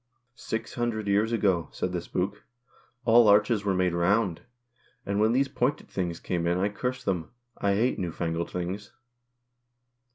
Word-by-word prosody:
" 125 Hz, -, -48 dB, 0.2 s
Six 110 Hz, 0 st, -2 dB
hundred 115 Hz, -3 st, -2 dB
years 105 Hz, +3 st, +2 dB
ago," 95 Hz, -7 st, +1 dB
said 90 Hz, -, -3 dB
the 90 Hz, -1 st, -2 dB
spook, 95 Hz, +4 st, -3 dB, 0.6 s
"all 115 Hz, -1 st, +6 dB
arches 105 Hz, +1 st, +4 dB
were 100 Hz, -2 st, +1 dB
made 90 Hz, -1 st, +1 dB
round, 90 Hz, +1 st, +1 dB, 0.6 s
and 100 Hz, 0 st, -1 dB
when 110 Hz, +1 st, +4 dB
these 135 Hz, +3 st, +2 dB
pointed 135 Hz, +3 st, -1 dB
things 85 Hz, -3 st, -3 dB
came 85 Hz, -2 st, -2 dB
in 85 Hz, +1 st, +2 dB
I 100 Hz, +3 st, +1 dB
cursed 125 Hz, +5 st, -4 dB
them. 85 Hz, -5 st, -1 dB, 0.3 s
I 100 Hz, -1 st, +2 dB
hate 120 Hz, +5 st, +1 dB
new 90 Hz, -2 st, -2 dB
fangled 85 Hz, +1 st, -2 dB
things." 90 Hz, +3 st, -5 dB
100 Hz, 165 wpm, -27 LUFS, 90-115 Hz, 0.6 s, all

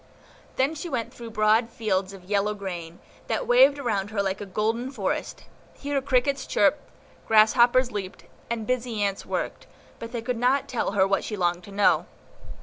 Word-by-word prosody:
Then 270 Hz, +4 st, +1 dB
she 320 Hz, +3 st, -6 dB
went 245 Hz, -6 st, -3 dB
through 235 Hz, -1 st, -9 dB
broad 220 Hz, +1 st, +2 dB
fields 195 Hz, -5 st, -1 dB
of 195 Hz, -2 st, -12 dB
yellow 205 Hz, +2 st, 0 dB
grain, 175 Hz, -4 st, -6 dB, 0.3 s
that -, -, -1 dB
waved 485 Hz, -, +5 dB
around 210 Hz, -7 st, -1 dB
her 210 Hz, -2 st, -1 dB
like 190 Hz, +1 st, -2 dB
a 205 Hz, -, -6 dB
golden 225 Hz, +6 st, -1 dB
forest; 270 Hz, -, -3 dB, 0.3 s
here 285 Hz, -1 st, -2 dB
crickets 270 Hz, 0 st, 0 dB
chirped, 210 Hz, +8 st, +2 dB, 0.5 s
grasshoppers 240 Hz, +3 st, +5 dB
leaped, 195 Hz, -3 st, -6 dB, 0.3 s
and 230 Hz, -2 st, -3 dB
busy 235 Hz, -3 st, -1 dB
ants 200 Hz, -1 st, -2 dB
worked, -, -, -4 dB, 0.3 s
but 230 Hz, 0 st, -7 dB
they 235 Hz, -2 st, -4 dB
could 250 Hz, 0 st, -2 dB
not 265 Hz, +3 st, +2 dB
tell 240 Hz, -6 st, -2 dB
her 190 Hz, -2 st, +4 dB
what 195 Hz, 0 st, 0 dB
she 210 Hz, -, -4 dB
longed 175 Hz, -1 st, 0 dB
to 200 Hz, -, -12 dB
know. 200 Hz, +1 st, +3 dB
225 Hz, 175 wpm, -25 LUFS, 200-255 Hz, 0.5 s, waved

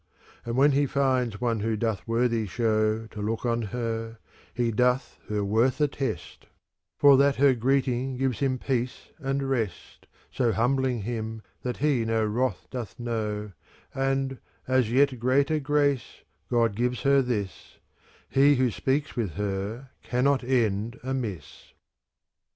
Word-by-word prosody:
And 120 Hz, +1 st, -3 dB
when 145 Hz, +2 st, +5 dB
he 140 Hz, +1 st, +2 dB
finds 130 Hz, -6 st, 0 dB
one 115 Hz, -2 st, 0 dB
who 110 Hz, +1 st, -1 dB
doth 110 Hz, -2 st, -2 dB
worthy 115 Hz, -1 st, +1 dB
show 110 Hz, 0 st, +1 dB
To 105 Hz, -1 st, -8 dB
look 110 Hz, +3 st, -2 dB
on 120 Hz, -1 st, +1 dB
her, 115 Hz, -1 st, -3 dB, 0.3 s
he 120 Hz, -2 st, 0 dB
doth 125 Hz, +3 st, +1 dB
her 105 Hz, -1 st, 0 dB
worth 115 Hz, +7 st, +2 dB
attest; 135 Hz, -, -3 dB, 0.5 s
For 140 Hz, -2 st, +7 dB
that 140 Hz, 0 st, +4 dB
her 140 Hz, 0 st, +5 dB
greeting 130 Hz, +1 st, 0 dB
gives 130 Hz, -2 st, -1 dB
him 135 Hz, -2 st, +1 dB
peace 125 Hz, -1 st, -3 dB
and 135 Hz, -1 st, -1 dB
rest. 115 Hz, -8 st, -3 dB, 0.2 s
So 120 Hz, -3 st, +1 dB
humbling 125 Hz, -1 st, +1 dB
him 110 Hz, -1 st, -4 dB, 0.2 s
that 125 Hz, -1 st, -3 dB
he 140 Hz, -4 st, +2 dB
no 115 Hz, -1 st, +1 dB
wrath 115 Hz, 0 st, -1 dB
doth 120 Hz, -6 st, -6 dB
know, 105 Hz, -3 st, -3 dB, 0.2 s
*" -, -, -30 dB
And, 135 Hz, 0 st, -1 dB, 0.3 s
as 130 Hz, -3 st, +2 dB
yet 135 Hz, 0 st, +3 dB
greater 140 Hz, +5 st, +2 dB
grace, 145 Hz, -3 st, 0 dB, 0.3 s
God 115 Hz, -4 st, +2 dB
gives 120 Hz, 0 st, -1 dB
her 140 Hz, 0 st, +5 dB
this; 105 Hz, -7 st, -4 dB, 0.5 s
He 140 Hz, +2 st, +4 dB
who 125 Hz, -2 st, +2 dB
speaks 145 Hz, +6 st, -1 dB
with 110 Hz, -, -2 dB
her 105 Hz, -, -4 dB
cannot 130 Hz, +2 st, +1 dB
end 115 Hz, -3 st, 0 dB
amiss. 120 Hz, -, -5 dB
125 Hz, 145 wpm, -27 LUFS, 110-135 Hz, 0.5 s, For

